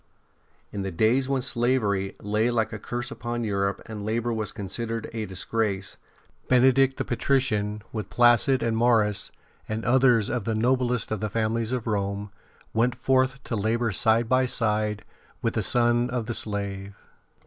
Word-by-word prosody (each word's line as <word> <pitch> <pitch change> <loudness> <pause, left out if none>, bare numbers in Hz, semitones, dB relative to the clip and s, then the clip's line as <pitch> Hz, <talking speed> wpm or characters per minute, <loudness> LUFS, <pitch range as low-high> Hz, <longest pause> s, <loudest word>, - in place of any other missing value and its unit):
In 100 - -4
the 95 - -3
days 115 +9 +2
when 135 -2 0
slavery 115 -6 0
lay 105 +3 0
like 115 -2 0
a - - -5
curse 120 0 -4
upon 120 0 -4
Europe 100 -2 -1
and 105 -2 -7
labour 115 +2 -1
was 110 -2 -3
con 100 -3 -6
sidered 115 +2 -3
a 110 -2 -3
disgrace, 100 +1 -2 0.5
Benedict 130 +1 +4
the - - -2
patrician, 110 -5 0
with 105 -4 -4
Placid 120 +2 +4
and 115 -1 0
Maurus 110 -4 +2 0.4
and 110 +1 -3
others 120 -3 +4
of 120 - -2
the 115 +1 -1
noblest 125 0 +1
of 110 - -1
the 110 - -2
families 115 +2 -1
of 125 -3 -2
Rome, 100 -2 -2 0.4
w^ent 120 +2 +2
forth 130 +1 +1
to 115 - -3
labour 115 +2 0
side 110 +4 +3
by 130 +1 +3
side 105 -3 -1 0.4
with - - 0
the - - 0
son 120 0 +2
of 125 -2 -2
the 120 - -3
slave. 100 -2 -3
115 Hz, 165 wpm, -26 LUFS, 105-120 Hz, 0.5 s, Benedict